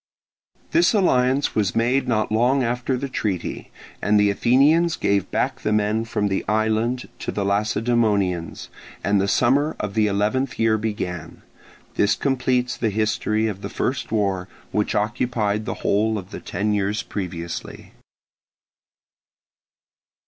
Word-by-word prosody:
This 335 -8 +4
alliance 135 -8 +2
was 100 -4 0
made 125 +4 +1
not 110 -3 0
long 125 +5 +3
after 125 +2 -1
the 140 +2 -3
treaty; 105 -8 -3 0.3
and 105 0 +3
the 105 0 +4
Athenians 145 +10 +3
gave 100 -1 0
back - - -1
the 110 - -1
men 105 +1 +1
from 105 -2 -1
the 95 -1 -1
island 110 +4 0
to - - -3
the 100 - -2
Lacedaemonians, 105 -4 0 0.3
and 100 +2 +2
the 100 - 0
summer 140 +8 +2
of 105 -1 -3
the 110 0 +2
eleventh 105 +6 0
year 110 -1 +2
began. 90 -6 -4 0.5
This 100 0 +3
completes 125 -2 0
the 115 - 0
history 110 +1 0
of 100 -3 -3
the - - -5
first 130 -1 -2
war, 95 -4 0 0.2
which 105 -1 0
occupied 105 0 0
the - - -3
whole 110 +2 +2
of 95 -1 -8
the - - -6
ten 105 +4 -2
years 105 +1 0
previously. 85 -4 -6
110 Hz, 140 wpm, -22 LUFS, 100-125 Hz, 0.5 s, This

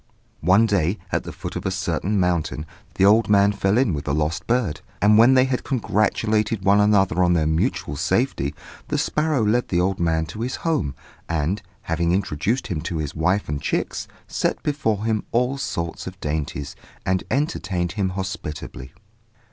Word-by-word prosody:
One 95 +7 +4
day, 100 -2 +1
at - - -1
the - - -5
foot - - -7
of - - -4
a - - 0
certain 95 +2 -1
mountain, 85 -4 0 0.3
the 95 - +4
old 110 +3 +5
man 100 0 +5
fell 100 +1 +1
in 120 -8 +3
with 70 -2 -4
the 70 - 0
lost 75 +2 -1
bird; 115 -11 0 0.2
and 105 +1 +5
when 120 +4 +7
they 130 0 +5
had 130 -1 -1
congratulated 110 -3 0
one 100 +1 +5
another 95 -4 +3
on 90 0 +4
their 80 -3 +2
mutual 80 -2 0
safety, 70 +1 0 0.3
the - - -1
sparrow 150 -6 +1
led 120 +4 +2
the 85 - +1
old 95 +1 0
man 80 -2 +1
to 90 +7 -8
his 125 +2 -2
home, 150 - 0 0.3
and, 85 +4 0 0.2
having 85 +1 0
introduced 95 - 0
him 90 -8 -3
to 85 0 -3
his 75 -2 -3
wife 90 +5 +1
and 75 0 -3
chicks, - - -2 0.2
set - - -1
before 110 -8 0
him 110 -2 0
all 125 +3 +1
sorts 85 -10 -4
of 95 +1 -8
dainties, 75 -3 -3 0.3
and 95 0 +1
entertained 95 - -1
him 95 -1 -1
hospitably. 75 -8 -6
95 Hz, 180 wpm, -23 LUFS, 80-110 Hz, 0.3 s, when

